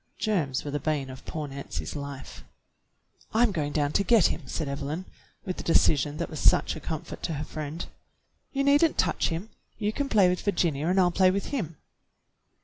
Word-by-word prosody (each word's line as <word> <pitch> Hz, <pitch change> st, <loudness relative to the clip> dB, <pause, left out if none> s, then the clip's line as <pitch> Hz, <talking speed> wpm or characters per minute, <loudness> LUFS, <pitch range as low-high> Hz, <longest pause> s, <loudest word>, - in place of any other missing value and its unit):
Germs 160 Hz, -, 0 dB
were 145 Hz, -, -3 dB
the 145 Hz, -, -1 dB
bane 145 Hz, -2 st, -1 dB
of 130 Hz, -, -11 dB
poor 155 Hz, -2 st, -3 dB
Nancy's 95 Hz, -, -6 dB
life. 140 Hz, -2 st, -7 dB, 0.9 s
"I'm 235 Hz, -1 st, +4 dB
going 150 Hz, -6 st, -1 dB
down 145 Hz, -1 st, +1 dB
to 200 Hz, -, +2 dB
get 225 Hz, -4 st, +5 dB
him," -, -, +1 dB
said 155 Hz, +2 st, -3 dB
Evelyn, 145 Hz, +6 st, -3 dB, 0.4 s
with 185 Hz, -, -3 dB
the -, -, -5 dB
decision 150 Hz, -3 st, +3 dB
that -, -, -2 dB
was 155 Hz, -, -7 dB
such -, -, +4 dB
a -, -, -6 dB
comfort 155 Hz, 0 st, -5 dB
to 165 Hz, -, -2 dB
her 150 Hz, -, -3 dB
friend. 155 Hz, +3 st, -5 dB, 0.7 s
"You 275 Hz, 0 st, 0 dB
need 280 Hz, +2 st, +5 dB
n't 325 Hz, -, +2 dB
touch -, -, +2 dB
him. 170 Hz, +7 st, -4 dB, 0.3 s
You 210 Hz, 0 st, -1 dB
can 280 Hz, +2 st, -2 dB
play 205 Hz, -6 st, +5 dB
with 180 Hz, 0 st, 0 dB
Vir 205 Hz, -, 0 dB
ginia 160 Hz, -2 st, +1 dB
and 190 Hz, +1 st, +3 dB
I'll 180 Hz, -1 st, +4 dB
play 185 Hz, +1 st, +5 dB
with 195 Hz, +2 st, -1 dB
him." 175 Hz, -, -3 dB
160 Hz, 205 wpm, -27 LUFS, 145-195 Hz, 0.9 s, get